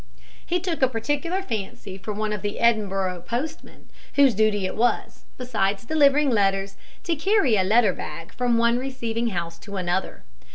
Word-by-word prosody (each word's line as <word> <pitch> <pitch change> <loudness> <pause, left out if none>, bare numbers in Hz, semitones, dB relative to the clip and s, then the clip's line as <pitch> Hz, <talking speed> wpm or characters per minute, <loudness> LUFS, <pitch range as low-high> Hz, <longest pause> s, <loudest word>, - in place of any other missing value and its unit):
He 355 +1 0
took 340 -3 -3
a 260 - +6
particular 290 - -2
fancy 200 - -5
for 195 +3 -6
one 210 +1 -2
of 210 - -4
the 205 0 -3
Edinburgh 195 -6 +1
postmen, 290 +7 -5 0.3
whose 280 -3 +6
duty 210 -1 +2
it 185 - -3
was, 240 +2 -1
besides 210 -5 -1
delivering 290 0 +4
letters, 195 -2 +1 0.3
to 335 - 0
carry 320 - +3
a 190 - +3
letter 210 0 +4
bag 165 -1 -8
from 245 -2 +1
one 235 +1 +3
receiving 235 -3 -2
house 170 -5 -4
to 200 0 -9
another. 180 - -2
225 Hz, 165 wpm, -24 LUFS, 195-265 Hz, 0.3 s, a